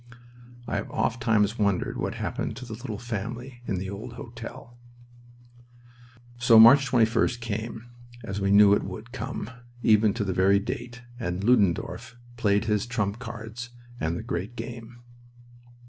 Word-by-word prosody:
I - - -1
have - - -4
ofttimes 115 -2 +1
wondered 100 -3 +1
what - - -3
happened 110 - -3
to 125 - -7
the 115 - -7
little 110 -1 -6
family 120 +2 -6
in 95 - -1
the 95 +2 -4
old 110 +5 -7
hotel. 120 +1 -10 1.6
So 120 -1 +6
March 135 +4 +8
21st 115 0 +2
came, 115 0 -5 0.4
as 100 -3 -4
we 100 - +1
knew 100 0 +7
it - - +3
would 105 +5 -8
come, 130 -3 -5 0.3
even 110 -1 +4
to 115 - -1
the 95 -2 -1
very 95 +2 +4
date, 120 +4 -5 0.2
and 90 -3 -3
Ludendorff 105 -1 +1 0.2
played 105 -2 +1
his 105 0 0
trump 110 -3 -2
cards 120 0 -7 0.3
and 80 +2 -1
the - - -6
great 95 +8 -4
game. 115 +1 -8
115 Hz, 145 wpm, -26 LUFS, 100-120 Hz, 1.6 s, March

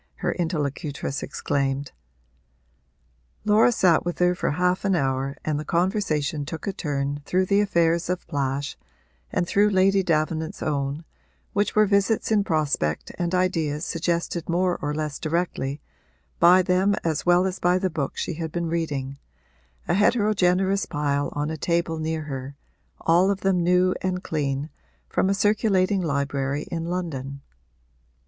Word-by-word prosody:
her - - -1
interlocutress 150 -4 -2
exclaimed. 140 0 -2 1.5
Laura 215 +3 +5
sat 180 -7 +3
with 175 0 -3
her 180 0 +3
for 180 - -1
half 180 +4 +1
an 195 -2 +2
hour 135 -2 -1
and 150 -1 0
the - - -4
conversation 165 -5 0
took 160 +3 -6
a 200 - -2
turn 145 -4 -2
through 185 +5 +1
the 200 +2 +3
affairs 170 -4 +1
of 180 0 -2
Plash 140 0 -2 0.6
and 175 - 0
through 205 +4 +3
Lady 195 0 +3
Davenant's 160 -2 -1
own, 145 +1 -2 0.5
which 205 +1 0
were 215 0 +6
visits 200 +3 +1
in 210 -2 +4
prospect 145 - -1
and 175 +1 0
ideas 165 -4 0
suggested 170 0 -2
more 180 +1 +1
or 145 - -1
less 150 -2 -3
directly 155 -4 -2 0.6
by 180 +2 +7
them 185 +2 +2
as 160 -3 -1
well 175 +1 +5
as 190 0 -3
by 180 +1 +3
the 185 0 -1
books 150 -4 -3
she - - -2
had 160 0 -5
been 170 0 -2
reading, 140 -5 -3 0.7
a 175 - +1
heterogeneous 195 -2 +2
pile 145 -2 -1
on 145 +1 -2
a 160 - -4
table 170 +1 0
near 160 0 -2
her, 135 -1 -6 0.5
all 175 +4 +4
of 200 -1 -1
them 190 -2 +2
new 180 +1 +3
and 185 -1 -2
clean, 145 -1 -2 0.4
from 190 - +1
a 195 - +2
circulating 200 -2 +2
library 140 -2 -1
in 165 -1 -3
London. 140 -6 -4
170 Hz, 150 wpm, -24 LUFS, 145-185 Hz, 1.5 s, by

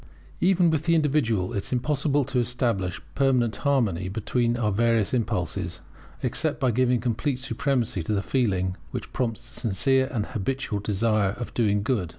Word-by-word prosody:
Even 180 -2 +4
with 155 -1 -1
the 170 -1 +4
individual, 135 - +1
it 100 - -1
is - - -5
impossible 140 +2 +1
to 125 -1 0
establish 115 -7 -1
permanent 130 -5 +2
harmony 110 - +1
between 120 +3 0
our 110 -3 +1
various 115 0 +2
impulses, 90 -6 -2 0.4
except - - 0
by 130 - +2
giving 125 +1 +2
complete 125 +4 -1
supremacy 130 -6 -1
to 95 +7 -2
the 100 - 0
feeling 95 -8 0
which - - -6
prompts 120 -2 -2
the - - -4
sincere 130 +5 +2
and 110 -6 -1
habitual 125 -1 -2
desire 105 -1 +1
of 120 +2 -7
doing 105 -3 +1
good. 110 -9 0
120 Hz, 160 wpm, -25 LUFS, 100-130 Hz, 0.4 s, Even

